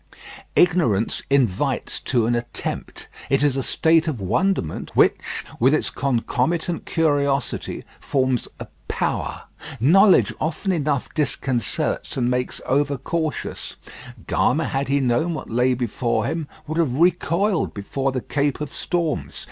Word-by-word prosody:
Ignorance 155 - +3
invites 125 -9 +1
to 120 -4 +1
an 120 - +1
attempt. 120 0 -4 0.2
It 135 +1 +2
is 145 -3 +3
a 135 - 0
state 160 +4 +2
of 145 -7 -2
wonderment, 100 - -1
which, - - +5 0.4
with 130 +5 +5
its - - -1
concomitant 140 +6 -1
curiosity, 145 -4 0 0.2
forms 130 -3 0
a - - -5 0.2
power. - - -2 0.4
Knowledge 190 - +5
often 165 +5 -1
enough 150 -6 -1
disconcerts 135 - -1
and 125 -1 +1
makes 125 0 -1
over 140 +1 +1
cautious. 160 +3 -3 0.5
Gama, - - +1
had 135 +1 -1
he 140 +1 +2
known 135 +7 +1
what - - -7
lay 125 +2 +2
before 120 0 -1
him, 160 -2 -2 0.2
would 155 +2 -3
have 140 -7 +1
recoiled 175 +4 +1
before 135 +7 -2
the 130 -1 -2
Cape 140 +1 -1
of 150 -2 -5
Storms. 155 - -2
140 Hz, 130 wpm, -22 LUFS, 125-160 Hz, 0.5 s, which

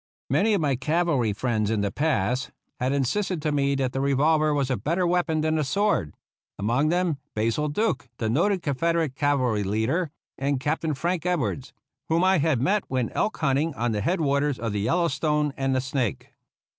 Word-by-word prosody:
Many 215 +1 +3
of 190 - 0
my 140 -3 +1
cavalry 150 -3 +1
friends 110 0 -1
in 110 -2 0
the 100 -1 -1
past 130 -3 0 0.3
had 130 +1 0
insisted 165 +7 0
to 155 - +1
me 140 -1 +1
that 130 -2 -1
the 135 - -1
revolver 150 +3 +3
was 140 -3 0
a - - +2
better 170 - 0
weapon 170 -3 +1
than 155 0 +1
the 155 - +1
sword 195 - 0 0.2
— - - -71
among 120 +9 +1
them 175 -4 0 0.2
Basil 115 +8 0
Duke, 145 - -1
the 110 - -2
noted 170 - +1
Con 145 - 0
federate 165 0 0
cavalry 130 -7 +1
leader, 110 - 0 0.3
and 140 0 0
Captain 155 +2 -1
Frank 170 +4 -1
Ed 180 0 +2
wards, 95 - -3 0.4
whom 165 +2 +2
I 190 -1 +4
had 150 -4 +2
met 195 - +1
when 130 -3 -1
elk 215 - -1
hunting 145 +2 0
on 120 0 -1
the 105 -1 -1
head 175 - 0
waters 140 -2 +1
of 115 -3 -3
the 105 - -1
Yellowstone 150 - +1
and 135 -1 0
the 130 - +1
Snake. 130 -4 -3
140 Hz, 195 wpm, -25 LUFS, 125-165 Hz, 0.4 s, I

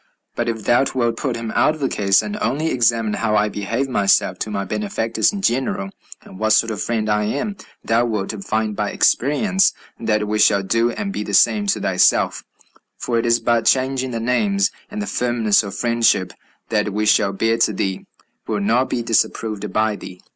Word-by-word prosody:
But 120 0 -1
if 110 -2 -4
thou 120 +5 +3
wilt 120 -2 0
put 130 0 -2
him 115 -1 -5
out 155 - +2
of - - -12
the 135 - 0
case, 100 -5 +2
and 210 - -5
only 160 -5 0
examine 115 -3 +1
how 105 -1 0
I 105 0 +2
behave 115 +7 -2
myself 100 -6 +1
to - - -3
my 100 -2 -3
benefactors 105 +2 -1
in 200 -1 -6
general, 120 - -1 0.3
and 95 - -13
what 110 0 +2
sort 115 +1 +3
of 105 - -4
friend 110 -2 -1
I 105 0 +1
am, 145 - -2 0.3
thou 115 +2 +2
wilt 110 -3 -3
find 110 -1 -1
by - - -2
experience 190 - +2 0.3
that 105 -1 0
we 105 +1 -1
shall 100 -2 +4
do 115 +4 +1
and 200 - -4
be - - -3
the 100 -1 -2
same 105 -3 +3
to - - +1
thyself, - - +2 0.5
for 120 -2 -1
it 115 - -1
is 115 0 +3
but 115 -1 +1
changing 130 0 +1
the 115 -2 -4
names, 200 - +1 0.2
and 210 0 -4
the - - -4
firmness 120 - +1
of 100 -3 -7
friendship 115 -6 +1 0.4
that 105 -2 0
we 105 +1 -1
shall 105 -1 +3
bear 115 +3 0
to 115 - +3
thee 95 -1 -3 0.4
will 105 -2 -1
not 115 +6 +1
be 120 - -2
disapproved 110 -2 -1
by 110 0 +1
thee." 90 -2 -10
115 Hz, 200 wpm, -20 LUFS, 105-125 Hz, 0.5 s, shall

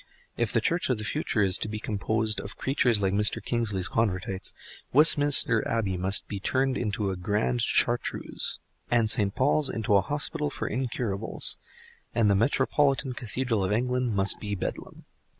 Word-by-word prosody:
If 120 -3 -1
the 115 - +1
Church 170 +8 0
of 125 - +1
the 105 - -6
future 115 -3 -1
is 95 -2 +2
to - - -3
be 110 - -4
composed 110 +1 -1
of 100 - -10
creatures 125 -6 +1
like 95 0 +1
Mr. 105 +1 +2
Kingsley's 105 -6 -1
Convertites, 95 -4 -2 0.4
Westminster 145 -5 +5
Abbey 105 -5 -1
must 95 +2 +1
be 100 - -5
turned 130 +6 0
into 105 -4 -2
a - - -4
Grand 90 - -1
Chartreuse, - - 0 0.3
and 115 -2 +2
St. 100 -2 +1
Paul's 145 +1 +2
into 110 -2 0
an 100 - +5
Hospital 145 - -2
for - - -5
Incurables, 115 -4 -1 0.6
and 110 -3 +3
the - - +3
metropolitan 135 +4 +1
Cathedral 120 -2 -2
of 95 - -1
England 125 0 0
must 95 0 0
be 105 -1 -4
Bedlam. 90 - -6
110 Hz, 165 wpm, -27 LUFS, 100-125 Hz, 0.6 s, Westminster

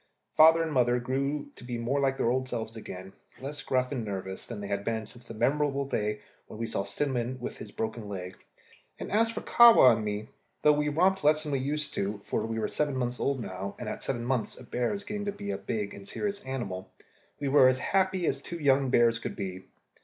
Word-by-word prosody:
Father 160 +1 +7
and 160 -2 -3
mother 125 -2 +3
grew 140 +4 -2
to - - -13
be 120 -1 -4
like 135 +3 0
their 115 - +2
old 130 0 -1
selves 110 -1 -4
again, 95 -3 -8 0.3
less 145 +3 -5
gruff 130 0 0
and 130 -5 -2
nervous 95 -2 -5
than 115 -3 -6
they 100 - -5
had 100 0 -2
been 110 0 -2
since 120 +3 -11
the 115 - -9
memorable 140 +3 +1
day 105 -5 -2 0.3
when - - -10
we 115 - -2
saw 105 - -1
Cinnamon 130 +2 -2
with 120 - -5
his - - -8
broken 110 -1 -4
leg; 90 -2 -6 0.6
and - - -6
as 225 +2 +3
for 230 - -4
Kahwa 230 - +8
and 110 - -3
me, 105 +1 -3 0.3
though 150 - +7
we 150 0 +1
romped 185 +6 +2
less 155 +1 +4
than 150 - -4
we 135 - +1
used 145 +3 -2
to 100 +1 -1
do 100 - -11
for - - -1
we 115 0 -3
were 110 - 0
seven 145 -2 -1
months 125 -1 -2
old 140 -1 0
now, 95 -2 -5
and 120 - -6
at - - -4
seven 120 -3 -2
months 125 -3 -1
a - - -10
bear 120 0 -1
is 200 0 -4
getting 205 0 -4
to 205 - 0
be 100 - -5
a 95 - -2
big 100 +1 -3
and 100 0 -11
serious 205 -1 -3
animal 100 -9 -4 0.5
we 145 - -2
were 135 -1 +7
as 130 0 +3
happy 190 +2 +1
as 135 -2 0
two 170 - -6
young 140 -3 +3
bears 120 -2 +4
could - - -5
be. 95 -2 -5
125 Hz, 235 wpm, -29 LUFS, 110-145 Hz, 0.6 s, Kahwa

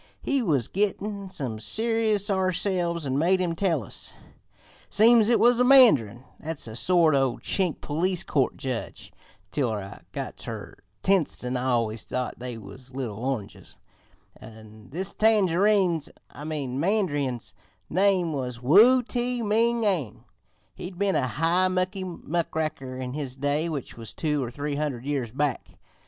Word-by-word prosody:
We 275 -2 +1
was 145 - +1
gittin' 200 0 -2
some 125 -11 -5
serious 215 - +1
ourselves 185 -3 0
an' 135 0 0
made 185 +4 +3
him 175 -2 0
tell 165 - 0
us. - - -7 0.8
"Seems 225 +1 +5
it 240 - +4
was 240 +1 +4
a - - +5
mandarin 180 - +6 0.2
that's 160 -1 -5
a 110 -1 -8
sort 170 +3 +3
o' 135 -3 +2
Chink 185 -5 -1
police 180 +4 0
court 135 -7 0
judge 130 -4 -5 0.4
(till 130 -6 0
I 100 -2 -6
got - - -6
ter - - -7 0.3
Tientsin 155 -9 0
I 125 0 -2
always 115 -3 0
thought 125 -2 -4
they 125 -1 -6
was 125 +5 -12
little 115 -6 -4
oranges), 130 -7 -5 0.6
an' 110 -1 -14
this 185 +7 -4
tangerine's 195 -5 +2 0.2
I 150 - -9
mean 140 -5 -3
mandarin's 145 - -1 0.3
name 185 -2 +2
was 125 -4 -4
Wu 215 - +6
Ti 245 0 -2
Ming, 230 +2 +2
an' 170 - -1 0.5
he'd 180 0 -9
been 200 0 +1
a 130 - +1
high 165 +8 +1
mucky 185 +1 -1
muckraker 160 -6 -3
in 130 -1 -5
his 140 -3 -5
day, 145 +4 -1
which 145 -7 -6
was 115 -2 -9
two 150 -3 -1
or 120 - -4
three 145 +3 -4
hundred 140 -5 -3
years 135 -6 -2
back. 140 0 -3
160 Hz, 150 wpm, -26 LUFS, 130-195 Hz, 0.8 s, mandarin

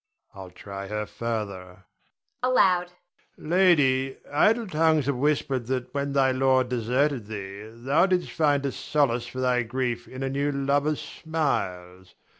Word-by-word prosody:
I'll 95 -2 -9
try 100 +2 -8
her 105 +1 -3
further 100 -3 -5 0.6
[aloud]. 190 -8 +3 0.5
Lady, 145 -7 +3
idle 225 +10 +3
tongues 160 -5 +2
have 140 -1 0
whispered 135 -3 0
that 130 0 -3
when 140 0 -2
thy 135 -1 +3
lord 130 -1 +2
deserted 125 0 0
thee 100 0 -7
thou 135 +10 +2
didst 180 -2 0
find 145 -3 +1
a 140 - 0
solace 125 -6 0
for 130 +1 -6
thy 125 -1 +2
grief 120 0 -3
in 130 +1 -7
a - - -1
new 140 +2 0
lover's 140 +2 0
smiles. 95 - -3
130 Hz, 140 wpm, -26 LUFS, 115-145 Hz, 0.6 s, aloud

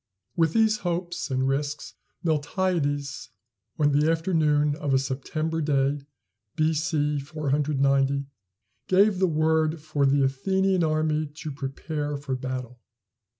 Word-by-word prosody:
With 165 -1 +2
these 220 -1 +3
hopes 175 -3 -3
and 130 0 0
risks, 145 +2 -2 0.3
Miltiades, 145 -3 -1 0.5
on 145 -2 +3
the 150 +2 +3
afternoon 155 -3 +2
of 145 -4 0
a - - +6
September 155 +5 -2
day, 140 -1 +1 0.5
B.C. 155 -2 +1
490, 140 -2 +1 0.6
gave 195 +1 +4
the 190 - +3
word 160 0 +1
for 145 -2 0
the 140 +1 +3
Athenian 190 +7 +1
army 155 -1 +1
to 150 +1 -8
prepare 145 +2 -4
for 140 -2 -3
battle. 125 -1 -5
150 Hz, 115 wpm, -26 LUFS, 140-160 Hz, 0.6 s, a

